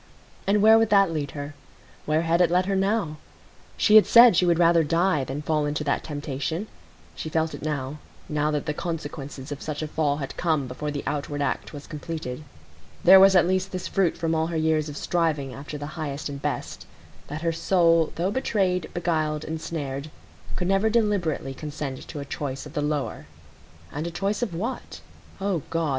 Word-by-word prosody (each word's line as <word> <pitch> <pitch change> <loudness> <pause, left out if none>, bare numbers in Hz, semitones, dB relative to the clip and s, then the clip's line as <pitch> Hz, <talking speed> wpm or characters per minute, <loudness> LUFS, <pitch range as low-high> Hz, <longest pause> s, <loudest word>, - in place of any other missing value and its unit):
And 205 +1 +3
where 220 +1 +8
would 225 -1 +2
that 195 -3 +5
lead 150 -3 -3
her? 145 +1 -5 0.5
Where 155 +2 +2
had 170 +1 +2
it 175 - +4
led 180 +1 +2
her 195 +1 0
now? 195 -5 0 0.6
She 215 0 +6
had 215 - +6
said 235 -3 +8
she 180 +1 +3
would 170 -1 +3
rather 170 -1 +5
die 165 -1 +2
than 135 +3 -5
fall 150 -1 0
into 150 +1 -2
that 145 - 0
temptation. 145 +4 -3 0.5
She 155 - -6
felt 160 0 0
it - - -7
now,—now 150 +1 -3
that 150 -2 -1
the 150 - -1
consequences 145 -4 -6
of 145 - -5
such 155 0 -4
a - - -3
fall 150 -2 0
had 135 -3 -5
come 155 -5 +1
before 130 +4 -5
the 145 -1 -4
outward 145 0 -3
act - - -2
was 145 -1 -9
completed. 155 -3 -6 0.6
There 190 +2 +9
was 195 0 +7
at 180 - +6
least 185 +1 0
this 185 -1 -4
fruit 195 -4 +1
from 165 -1 -1
all 160 0 +1
her 165 -1 -3
years 155 -1 +1
of 145 - -7
striving 155 -7 -1
after 145 +3 -7
the 145 - -6
highest 150 -3 -4
and 140 -1 -7
best,—that 150 +2 -6
her 165 - +2
soul 165 -1 +3
though 180 +4 0
betrayed, 190 -7 0
beguiled, 155 -3 0
ensnared, 155 -3 -4 0.5
could 180 - -2
never 195 +3 +3
deliberately 200 -11 0
consent 145 -2 -6
to 150 - -7
a 140 - -5
choice 140 -1 -5
of 150 - -11
the 150 - -1
lower. 145 - -2 0.6
And 150 +3 -4
a - - -2
choice 195 +5 -2
of 210 -8 -2
what? 225 +10 -5 0.4
O 195 -4 -1
God! 165 -2 0
160 Hz, 190 wpm, -25 LUFS, 145-180 Hz, 0.6 s, There